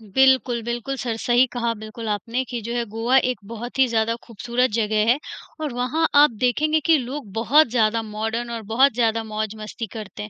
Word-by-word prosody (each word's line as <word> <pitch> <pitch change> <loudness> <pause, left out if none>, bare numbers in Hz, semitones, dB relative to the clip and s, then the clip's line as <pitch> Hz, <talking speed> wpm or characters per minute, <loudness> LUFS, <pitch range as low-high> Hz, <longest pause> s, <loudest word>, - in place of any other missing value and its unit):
बिल्कुल, 260 -3 +4
बिल्कुल, 240 +3 -3
सर 235 -2 -2
सही 245 +2 +3
कहा 235 -1 -1
बिल्कुल 220 +1 -7
आपने 230 +5 -2
कि 245 - -3
जो 235 +3 -5
है 240 - 0
गोवा 230 +4 +2
एक 250 - -3
बहुत 240 +3 -7
ही 265 - +5
ज़्यादा 230 0 0
खूबसूरत 240 +3 -1
जगह 215 -1 +1
है 255 - +2 0.4
और 295 -5 -3
वहाँ 255 +7 0
आप 290 0 +7
देखेंगे 305 +5 +2
कि 325 -1 +5
लोग 255 -3 -6
बहुत 275 +8 +4
ज़्यादा 230 -1 +1
मॉडर्न 225 +3 -3
और 230 -1 -4
बहुत 265 +3 +4
ज़्यादा 225 -1 +1
मौज-मस्ती 215 +1 -5
करते 210 -2 -7
हैं। 210 - -8
235 Hz, 190 wpm, -22 LUFS, 220-255 Hz, 0.4 s, आप